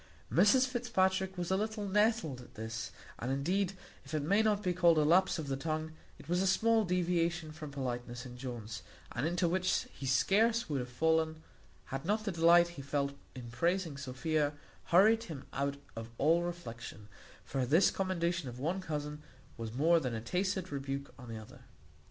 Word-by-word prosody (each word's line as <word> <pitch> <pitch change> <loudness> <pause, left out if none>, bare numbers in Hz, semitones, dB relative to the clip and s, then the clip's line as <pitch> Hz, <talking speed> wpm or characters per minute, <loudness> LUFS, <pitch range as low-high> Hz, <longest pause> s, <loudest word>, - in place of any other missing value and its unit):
Mrs 210 +9 +6
Fitzpatrick 190 -7 0
was 175 0 -2
a - - +4
little 215 +1 -2
nettled 205 - +1
at 125 - -16
this; 110 0 -4 0.3
and 125 +3 -2
indeed, 180 +8 0 0.3
if 140 +3 -6
it 150 - 0
may 200 +8 +3
not 210 -1 +1
be 180 - +1
called 170 -2 +5
a 155 - +4
lapse 180 +6 +4
of 155 -3 -4
the 135 - -1
tongue, 155 +2 -3 0.3
it - - -14
was 175 +2 +1
a 195 - +2
small 225 +3 +3
deviation 175 -3 0
from 155 -1 -8
politeness 125 -2 -4
in 125 -1 -9
Jones, 120 -3 -6 0.3
and 125 +6 -1
into 175 +1 +1
which 185 +2 +1
he 135 - -6
scarce 220 - +3
would 145 -3 -1
have 125 0 -4
fallen, 160 +4 +1 0.5
had 135 0 -2
not 215 +4 0
the 200 - 0
delight 170 0 +5
he 175 -5 -8
felt 140 0 -1 0.2
in 120 -2 -8
praising 170 +5 0
Sophia 145 +3 -1 0.3
hurried 220 +6 +5
him 155 -8 -7
out 140 +1 -1 0.2
of 115 0 -6
all 165 +4 +4
reflection; 120 - -6 0.4
for 135 -2 -1
this 155 +10 +4
commendation 170 -5 -1
of 120 - -9
one 170 +8 -1
cousin 150 -3 -4 0.3
was 115 -2 -5
more 160 +8 +4
than 125 -6 -2
a - - -2
tacit 185 - -1
rebuke 140 0 -4
on 125 -1 -10
the 115 - -5
other. 110 -1 -11
160 Hz, 185 wpm, -33 LUFS, 135-185 Hz, 0.5 s, Mrs